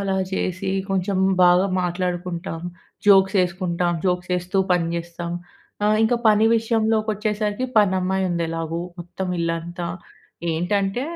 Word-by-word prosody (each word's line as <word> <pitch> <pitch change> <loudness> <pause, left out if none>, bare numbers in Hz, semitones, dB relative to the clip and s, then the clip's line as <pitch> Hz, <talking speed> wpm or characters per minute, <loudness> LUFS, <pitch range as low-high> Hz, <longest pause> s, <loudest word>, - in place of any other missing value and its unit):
అలా 195 -1 -1 0.2
చేసి, 190 +1 -2 0.2
కొంచెం 190 0 0 0.3
బాగా 180 +2 +5 0.2
మాట్లాడుకుంటాం, 175 -2 -3 0.5
జోక్స్ 195 -1 +6
ఎసుకుంటాం, 175 -1 -1
జోక్స్ 180 -1 0
వేస్తూ 180 +2 -1
పని 170 -2 +2
చేస్తాం. 170 0 -5 0.5
ఆహ్, 215 +1 +3
ఇంక 225 +2 +3
పని 215 +1 +5
విషయంలోకొచ్చేసరికి 215 0 0
పనమ్మాయి 190 -2 +2
ఉంది 170 -1 0
ఎలాగో. 165 0 -3 0.2
మొత్తం 180 +2 -5
ఇల్లంతా. 170 +1 -3 0.7
ఏంటంటే, 195 +7 0
185 Hz, 115 wpm, -22 LUFS, 175-205 Hz, 0.7 s, జోక్స్